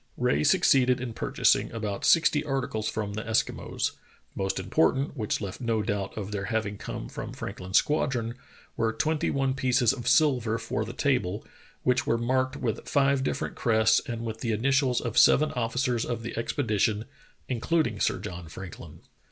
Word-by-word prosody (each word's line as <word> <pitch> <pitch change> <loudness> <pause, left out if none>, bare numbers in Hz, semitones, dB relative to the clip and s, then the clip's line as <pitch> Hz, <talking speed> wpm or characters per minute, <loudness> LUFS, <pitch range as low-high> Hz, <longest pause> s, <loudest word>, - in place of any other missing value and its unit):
Rae 70 +1 +1
succeeded 125 - +4
in 120 -2 -5
purchasing - - +1
about 105 -3 -3
sixty 160 -3 +4
articles 130 -7 -2
from 105 -2 -3
the 110 - -3
Eskimos. 110 +1 -1 0.4
The - - -3
most 95 - -1
important, 135 - +1
which 110 -5 -2
left 100 +4 -6
no 115 -3 0
doubt 100 -1 -3
of 105 -1 -4
their 100 -1 -3
having 110 -3 -2
come - - -6
from - - -7
Franklin's 95 +2 -2
squadron, 125 -6 +1 0.4
were 115 0 +1
twenty 150 +7 0
one 135 -1 0
pieces 130 -2 +2
of 120 -3 -6
silver 125 -8 +3
for 115 -1 -3
the 115 - -7
table, 120 -8 0 0.4
which 125 +4 +1
were 115 - +2
marked 130 +2 0
with 115 -3 -3
five 140 -1 +3
different - - -2
crests 110 -1 +3
and 115 -1 -4
with 110 -1 -5
the 115 -1 -1
initials 130 +2 +2
of 115 -2 +1
seven 155 +1 +5
officers 120 0 0
of 115 -2 -4
the 120 - -5
expedition, 110 -3 0 0.4
including 125 -3 0
Sir - - +1
John 90 -4 -7
Franklin. 90 +2 -10
115 Hz, 170 wpm, -27 LUFS, 110-130 Hz, 0.4 s, seven